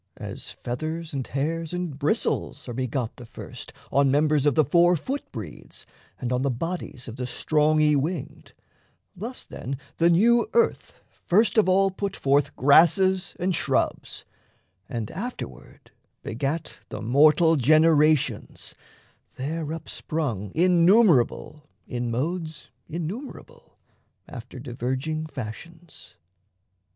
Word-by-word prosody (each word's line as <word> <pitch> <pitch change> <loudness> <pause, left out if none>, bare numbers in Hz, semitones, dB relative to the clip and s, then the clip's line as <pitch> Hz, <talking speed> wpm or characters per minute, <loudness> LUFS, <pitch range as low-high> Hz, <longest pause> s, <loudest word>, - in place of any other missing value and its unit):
As - - -7
feathers 155 +6 -5
and 135 -2 -3
hairs 160 +4 -2
and 175 -6 -4
bristles 150 +1 -1
are 120 - -5
begot 125 -1 -3
The 125 - -10
first - - -9 0.2
on 140 0 +3
members 150 +1 +2
of 145 - +3
the 155 - +4
four 175 +3 +4
foot 270 - -5
breeds 105 - -9 0.3
And 125 0 -2
on 125 - 0
the 140 - +1
bodies 140 -1 -5
of 115 +1 -8
the 125 -1 -3
strong 155 +4 +1
y 150 -1 +4
winged, 150 +2 -3 0.6
Thus 230 +8 -7
then 135 +2 -6 0.2
the 170 +1 +4
new 230 +7 +4
Earth 465 -1 +1 0.3
first 210 +5 +3
of 215 -4 +4
all 195 +1 +4
put 195 +1 -4
forth 140 +1 +1
Grasses 180 +7 +4
and 185 +1 0
shrubs, - - -1 0.6
and 115 -5 -4
afterward 190 - -8 0.3
begat 140 +8 -3
The 105 - -6
mortal 155 +7 +5
generations, 155 +1 +2 0.6
there 155 +3 -4
upsprung 145 - -4
Innumerable 170 - +3 0.2
in 120 -1 -3
modes 155 +3 -3 0.2
innumerable 230 - -7 0.5
After 125 0 -10
diverging 130 +5 -3
fashions. 160 +6 -10
155 Hz, 120 wpm, -25 LUFS, 130-175 Hz, 0.6 s, mortal